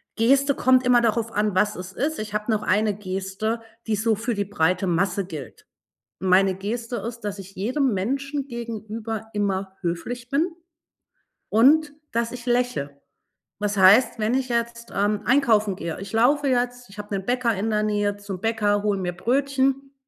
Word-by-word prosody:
Geste 275 +4 +3
kommt 255 0 +4
immer 245 -1 +5
darauf 230 0 0
an, 210 -2 0
was 210 +3 +2
es 180 +1 -7
ist. 295 +7 -2
Ich 215 -1 -5
habe 210 +2 -2
noch 215 -1 0
eine 210 0 +2
Geste, 195 +3 -3 0.3
die 220 - +1
so 220 +1 +2
für 230 +3 -2
die 205 -1 -1
breite 185 0 +1
Masse 190 +3 0
gilt. 145 -10 -9 0.5
Meine 190 +1 +4
Geste 230 +5 -4
ist, 230 +3 -6
dass 205 -1 -4
ich 195 +1 -11
jedem 250 +6 0
Menschen 275 +8 -2
gegenüber 225 -2 -5
immer 195 -2 -2
höflich 230 +8 -4
bin 295 +6 +2 1.0
und 290 +7 +4 0.2
dass 230 0 -1
ich 245 -1 -8
lächel, 245 - 0 0.7
das 205 -1 -1
heißt, 205 +6 +6
wenn 220 +3 +1
ich 260 -1 0
jetzt, 235 0 -2
ähm, 205 +1 +1
einkaufen 225 -7 +3
gehe 165 -2 -4
ich 195 0 -7
laufe 275 +6 +3
jetzt, 245 -1 -1
ich 200 - -14
habe 205 0 -4
'nen 190 -1 -4
Bäcker 245 -2 +1
in 205 +4 -2
der 210 -1 +1
Nähe 205 -1 0
zum 200 -3 -7
Bäcker, 210 -2 +1
hole 205 -2 +1
mir 180 -1 -2
Brötchen. 270 +5 0
220 Hz, 175 wpm, -24 LUFS, 200-245 Hz, 1.0 s, heißt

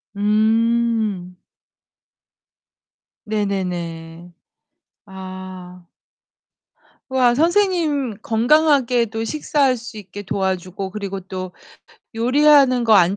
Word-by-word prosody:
음. 220 -2 +1 1.9
네네네. 175 -5 -4 0.7
아. 185 -2 -10 1.2
우와. 255 -2 +3
선생님 325 - +1
건강하게 250 +1 +3
또 225 +1 -4
식사할 275 0 0
수 230 -1 -10
있게 205 0 -9
도와주고, 190 0 -3
그리고 195 -1 -5
또 185 0 -7 0.6
요리하는 255 +1 +4
거 225 -2 +5
안 190 0 +4
215 Hz, 160 characters per minute, -20 LUFS, 185-250 Hz, 1.9 s, 거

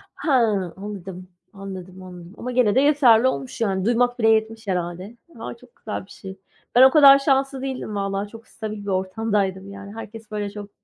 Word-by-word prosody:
Ha, 305 - -2 0.4
anladım, 190 -2 -8 0.2
anladım, 190 -2 -9
anladım. 180 +1 -12
Ama 250 - -5
gene 240 -5 +3
de 265 - +4
yeterli 260 -5 +5
olmuş. 140 - -5
Yani, 190 -4 0
duymak 245 +1 +1
bile 225 -1 +3
yetmiş 220 0 +1
herhâlde. 180 +4 -4 0.2
A, - - -6
çok 240 0 -21
güzel 210 -3 -6
bir - - -23
şey. 190 -1 -10 0.4
Ben 250 - +7
o 265 - +9
kadar 275 -2 +8
şanslı 270 -1 0
değildim 260 -5 -5
valla. 195 +1 -2
Çok 225 +1 -13
stabil 215 -2 -7
bir - - -11
ortamdaydım, 190 0 -1
yani. 200 +1 -10
Herkes 225 0 -10
böyle 205 -1 -3
çok 205 0 -9
210 Hz, 185 wpm, -22 LUFS, 190-240 Hz, 0.4 s, o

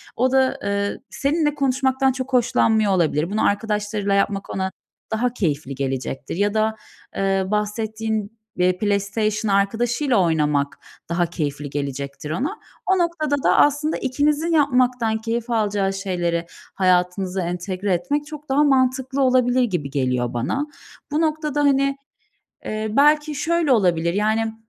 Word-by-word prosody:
o 255 +2 +2
da, 265 -1 +2
eee, 200 0 -1
seninle 295 +1 0
konuşmaktan 265 -1 +1
çok 260 0 -5
hoşlanmıyor 220 -3 +3
olabilir. 165 -3 +1
Bunu 215 - +1
arkadaşlarıyla 210 -1 0
yapmak 200 0 0
ona 190 0 -2 0.4
daha 240 +2 0
keyifli 150 - -2
gelecektir 135 +1 -3
ya 205 +3 +1
da, 220 0 +1 0.4
eee, 195 -1 +1
bahsettiğin 215 +1 -2 0.2
be 180 0 +2
PlayStation 205 +1 0
arkadaşıyla 235 +6 +1
oynamak 150 -5 +1 0.3
daha 175 +1 +1
keyifli 150 -4 -4
gelecektir 140 +1 -5
ona. 295 - -2 0.3
O 380 - +3
noktada 340 -4 0
da - - +4
aslında 295 +2 +3
ikinizin 295 +5 0
yapmaktan 250 -6 +2
keyif 230 +2 -3
alacağı 205 -4 0
şeyleri 175 -3 -2 0.3
hayatınıza 185 0 +1
entegre 180 +2 -2
etmek 290 +10 -1
çok 300 -2 -10
daha 280 +2 +3
mantıklı 265 -1 +2
olabilir 255 -1 +3
gibi 175 - -2
geliyor 125 -3 -1
bana. 270 - -1 0.4
Bu 305 +2 +1
noktada, 305 -2 -1
hani, 275 -1 +2 0.7
eee, 215 0 -3
belki 295 +3 +3
şöyle 325 0 +1
olabilir, 175 -6 +2
yani, 220 +2 0
220 Hz, 130 wpm, -22 LUFS, 185-265 Hz, 0.7 s, da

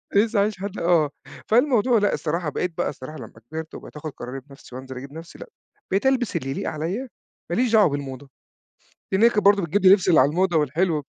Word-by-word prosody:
لسه 215 +1 +3
عايش 205 -1 0
لحد 200 +1 -5
آه، 170 -4 +3 0.4
فالموضوع 245 0 +3
لأ، 205 - +1
الصراحة 165 0 -2
بقيت 175 +3 -3
بقى 175 - 0
الصراحة 150 +2 -9
لمّا 115 -4 -10 0.2
كِبِرت 160 0 -6
وبقيت - - -11
آخُد 155 +1 -6
قراري 125 +2 -6
بنفْسي 135 -2 -15
وانزِل 130 0 -8
أجيب 135 +2 -9
لنفْسي 165 +1 -11
لأ، - - -9 0.4
بقيت 195 +7 +1
ألبِس 255 -3 +1
اللي 135 - -2
يليق - - -3
عليَّ 185 - -4 0.4
ما 175 - 0
ليش 245 0 +1
دعوة 215 -5 +6
بالموضة، 140 -1 -6 0.8
لإن 190 +2 +2
هي 235 - +7
كانت 210 -2 0
برضه 200 0 +5
بتجيب 175 +5 0
لي 185 - +8
لِبس 190 -2 +3
اللي 165 - +6
على 135 +3 +4
الموضة 175 +1 +1
والحلو 155 +1 0
170 Hz, 215 wpm, -23 LUFS, 145-205 Hz, 0.8 s, لي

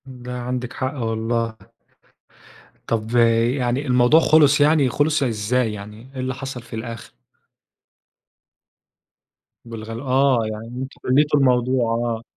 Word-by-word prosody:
امم، 125 -2 -12
لا، 125 0 -5
عندِك 125 0 -4
حق 130 +1 -3
والله. 115 -2 -2 1.3
طَب 115 +1 -2 0.4
يعني 130 +2 -1
الموضوع 125 +4 +5
خلص 150 -2 +4
يعني، 145 -2 +4
خلص 150 +3 +1
إزاي 115 0 0
يعني، 105 +3 -10
إيه 130 - -8
اللي 130 0 -2
حصل 135 -1 -6
في 115 - -10
الآخر؟ 115 0 -7 2.6
بالغل 115 0 -7
آه، 135 -1 +2
يعني 110 +1 -7
أنتم 130 +3 -7
حليتوا 145 +3 +3
الموضوع، 125 -1 +2
آه. 115 -1 -2
125 Hz, 120 wpm, -21 LUFS, 115-135 Hz, 2.6 s, الموضوع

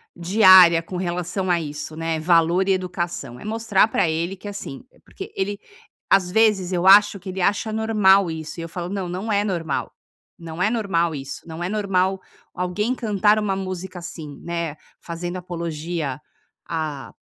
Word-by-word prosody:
diária 185 -2 +7
com 180 +2 -6
relação 180 +1 -3
a 175 - +2
isso, 150 0 -6
né, 165 0 -2
valor 170 +3 +3
e - - +5
educação? 175 -9 -4
É - - -11
mostrar 215 -2 +2
pra 195 -5 +1
ele 165 +4 -2
que, 195 - -11
assim 200 -9 -7
eh, - - -25
porque 395 +2 -9
ele 200 +1 -2 0.5
às 185 -2 +4
vezes, 210 -3 +3
eu 180 0 -1
acho 200 +1 +7
que 190 +1 -9
ele 185 0 -4
acha 205 +4 0
normal 205 -4 +4
isso 160 +1 -7
e - - -4
eu 165 - -7
falo: 175 +1 -5
"Não, 190 -3 -3
não 190 +5 -4
é 205 0 +2
normal, 170 -8 -2 0.5
não 165 0 -7
é 215 - +3
normal 185 -8 0
isso, 135 +2 -8
não 165 +1 -6
é 175 - -2
normal 190 -2 0 0.3
alguém 195 +6 -1
cantar 210 -2 +2
uma 205 -2 -1
música 185 -1 -5
assim, 160 -4 -8
né, 170 -3 -3 0.3
fazendo 175 +1 -5
apologia 165 -5 -4 0.5
a 155 -4 -4
180 Hz, 175 wpm, -22 LUFS, 165-200 Hz, 0.5 s, diária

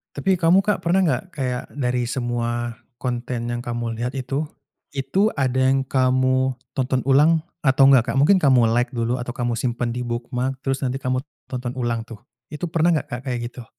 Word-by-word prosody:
Tapi 185 +6 +1
kamu, 175 +3 +5
Kak, 210 0 +1
pernah 185 +3 +3
nggak, 155 -7 +1
kayak 125 -4 -2
dari 125 -3 -1
semua 120 -1 -2 0.2
konten 120 -1 -3
yang 120 0 -4
kamu 120 -1 -3
lihat 125 +2 -3
itu, 135 +3 -2 0.5
itu 145 +11 +1
ada 130 -2 0 0.2
yang 135 - +2
kamu 130 0 +2 0.2
tonton 130 0 +1
ulang 155 +4 +5 0.2
atau 135 0 +6
nggak, 130 -4 +4
Kak? - - -4
Mungkin 190 +6 +6
kamu 130 -8 +4
like 125 +2 0
dulu 120 +1 -1
atau 120 0 -5
kamu 120 -2 -2
simpan 120 0 -1
di 125 +1 -3
bookmark, 125 +2 -3
terus 135 0 -1
nanti 130 +2 -2
kamu 130 0 0 0.3
tonton 125 -1 -4
ulang 120 -3 -2
tuh. 115 -3 -11 0.3
Itu 165 +3 -4
pernah 170 +1 +3
nggak, 150 -2 -1
Kak, 120 0 -5
kayak 125 -2 -2
gitu? 125 -1 -11
130 Hz, 185 wpm, -22 LUFS, 120-135 Hz, 0.5 s, atau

